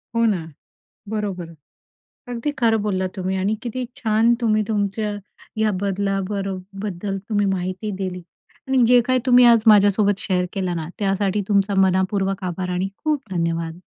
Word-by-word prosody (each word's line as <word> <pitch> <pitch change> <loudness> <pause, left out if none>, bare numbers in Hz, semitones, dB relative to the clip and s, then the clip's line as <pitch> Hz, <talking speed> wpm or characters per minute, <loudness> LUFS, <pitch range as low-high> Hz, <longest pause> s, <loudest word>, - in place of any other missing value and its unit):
हो 230 - +3
ना. 195 -7 +1 0.7
बरोबर. 195 -6 -4 0.8
अगदी 240 +5 -2
खरं 225 -3 +3
बोललात 190 -3 -1
तुम्ही 190 0 -2
आणि 195 +3 0
किती 250 +1 -3
छान 225 -1 +3
तुम्ही 215 -1 +2
तुमच्या 210 0 -1 0.5
ह्या 215 0 +2
बदला 195 0 0
बरो 195 -2 -3 0.3
बद्दल 195 0 -3
तुम्ही 205 -2 +1
माहिती 185 +3 -3
दिली 185 -2 -4 0.5
आणि 265 -2 +3
जे 245 0 +6
काही 255 0 +2
तुम्ही 250 -1 +6
आज 230 -2 +6
माझ्यासोबत 205 -1 +5
शेअर 180 -2 0
केलं 185 -3 -2
ना, 160 -2 -4
त्यासाठी 200 0 0
तुमचा 200 -1 +2
मनःपूर्वक 190 +1 0
आभार 180 0 -3
आणि 180 +2 -1
खूप 305 -3 0
धन्यवाद. 170 -1 -2
200 Hz, 150 wpm, -22 LUFS, 185-220 Hz, 0.8 s, जे